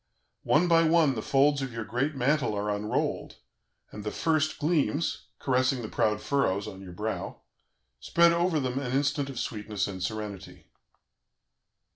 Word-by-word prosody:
One 170 +4 +4
by 165 -1 +5
one 160 -3 +4
the 110 - -3
folds 140 +3 +3
of 135 -1 -3
your 115 -1 -4
great 135 +7 -1
mantle 135 -3 +1
are 105 +1 -1
unrolled, 105 +1 -2 0.6
and 105 - -8
the 105 - -2
first 155 +4 0
gleams, 155 0 0
caressing 130 -1 +1
the 110 - -5
proud 105 0 0
furrows 105 -5 0
[on 95 - -8
your 95 -2 -9
brow], 105 +5 -4 0.6
spread 170 - +4
over 170 -2 +1
them 130 -1 -2
an 130 -2 -3
instant 140 0 0
of 135 - -7
sweetness 105 -3 -3
and 95 -2 -6
serenity. 105 -1 -5
130 Hz, 155 wpm, -28 LUFS, 105-150 Hz, 0.6 s, by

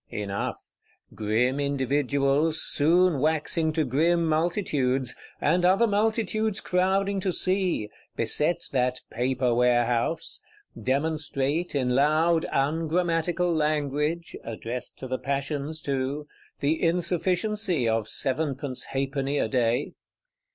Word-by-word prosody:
Enough: 100 -1 -3 0.6
grim 115 +6 0
individuals, 140 +2 +1
soon 170 +1 +3
waxing 160 +2 +1
to 155 - +1
grim 165 +6 +2
multitudes, 155 - 0 0.3
and 180 0 +2
other 190 +6 +4
multitudes 215 0 0
crowding 195 +2 +1
to 190 0 0
see, 185 - +1 0.3
beset 150 +9 +1
that 125 -1 0
Paper 125 +1 0
Warehouse; 120 +5 +1 0.3
demonstrate, 145 +3 -1
in 125 -3 +1
loud 155 +5 +3
ungrammatical 165 +4 0
language 150 +2 -1
(addressed 115 +2 -6
to 130 - -7
the 130 0 -3
passions 140 +2 -3
too), 140 +1 -2 0.4
the 155 +3 +1
insufficiency 180 - +1
of 110 -1 0
sevenpence 135 -1 -1
halfpenny 135 +1 -2
a - - +1
day. 120 +2 0
150 Hz, 100 wpm, -26 LUFS, 130-170 Hz, 0.6 s, other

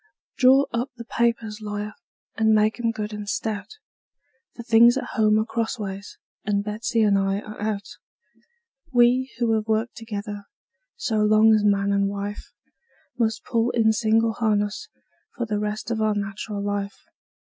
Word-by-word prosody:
Draw 265 +2 +6
up 240 +3 -1
the 235 - -8
papers, 230 -2 -1
lawyer, 210 0 -4 0.4
and 220 0 +3
make 215 +2 +2
'em 230 -1 +1
good 215 -1 -4
and 210 -1 -6
stout; 220 - -4 0.8
For 235 - -8
things 235 +1 +6
at - - -4
home 215 -1 +3
are 215 - +1
crossways, 210 -4 -4 0.3
and 200 -1 0
Betsey 220 +2 -1
and 200 -2 +3
I 195 0 0
are 215 -1 -10
out. 210 -2 -2 1.1
We, 250 +1 +3
who 235 -2 +1
have 215 0 -1
worked 220 +2 0
together 205 -2 -6 0.5
so 235 - -2
long 215 +1 +5
as 215 -1 +3
man 200 -1 +2
and 200 0 +2
wife, 200 +1 -6 0.7
Must 225 0 0
pull 230 0 +1
in 225 -2 +3
single 225 +1 +2
harness 210 -2 -1 0.5
for 240 - -1
the 210 -2 -2
rest 210 +2 -3
of 220 -1 -1
our 215 -1 +2
nat'ral 200 0 -4
life. 205 0 -3
215 Hz, 160 wpm, -24 LUFS, 205-230 Hz, 1.1 s, Draw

